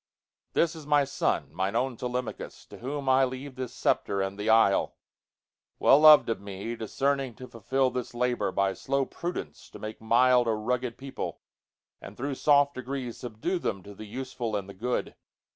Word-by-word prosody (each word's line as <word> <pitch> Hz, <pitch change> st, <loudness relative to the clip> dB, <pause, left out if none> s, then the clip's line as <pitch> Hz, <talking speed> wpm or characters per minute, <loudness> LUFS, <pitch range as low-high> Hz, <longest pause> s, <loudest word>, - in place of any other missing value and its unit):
This 170 Hz, 0 st, +2 dB
is 155 Hz, -3 st, -10 dB
my 145 Hz, -1 st, +4 dB
son, 135 Hz, -, -1 dB
mine 95 Hz, +5 st, -1 dB
own 125 Hz, +1 st, 0 dB
Telemachus, 125 Hz, +1 st, -5 dB
To -, -, -13 dB
whom 140 Hz, +2 st, -4 dB
I 130 Hz, 0 st, +5 dB
leave 130 Hz, +2 st, -4 dB
the 130 Hz, 0 st, -4 dB
sceptre 100 Hz, -3 st, 0 dB
and 95 Hz, 0 st, -2 dB
the 105 Hz, +2 st, -3 dB
isle—Well 110 Hz, +5 st, +1 dB
lov'd 155 Hz, -1 st, +8 dB
of 115 Hz, -, -2 dB
me, 100 Hz, +3 st, -5 dB
discerning 135 Hz, +3 st, -1 dB
to 130 Hz, -, -10 dB
fulfilThis 125 Hz, +1 st, -1 dB
labor, 125 Hz, 0 st, 0 dB
by 100 Hz, 0 st, +1 dB
slow 135 Hz, +4 st, -1 dB
prudence 150 Hz, -, -6 dB
to -, -, -11 dB
make 110 Hz, 0 st, -7 dB
mildA 120 Hz, +1 st, +4 dB
rugged 120 Hz, +2 st, -2 dB
people, 135 Hz, 0 st, -6 dB, 0.6 s
and 100 Hz, -, -10 dB
thro' 140 Hz, +3 st, -2 dB
soft 145 Hz, +1 st, +3 dB
degreesSubdue 130 Hz, -, -4 dB
them 95 Hz, -2 st, -2 dB
to 100 Hz, -, -10 dB
the 110 Hz, +2 st, -10 dB
useful 120 Hz, -1 st, -4 dB
and 100 Hz, -2 st, -3 dB
the 100 Hz, -, -9 dB
good. 120 Hz, +6 st, -2 dB
125 Hz, 160 wpm, -28 LUFS, 110-135 Hz, 0.6 s, lov'd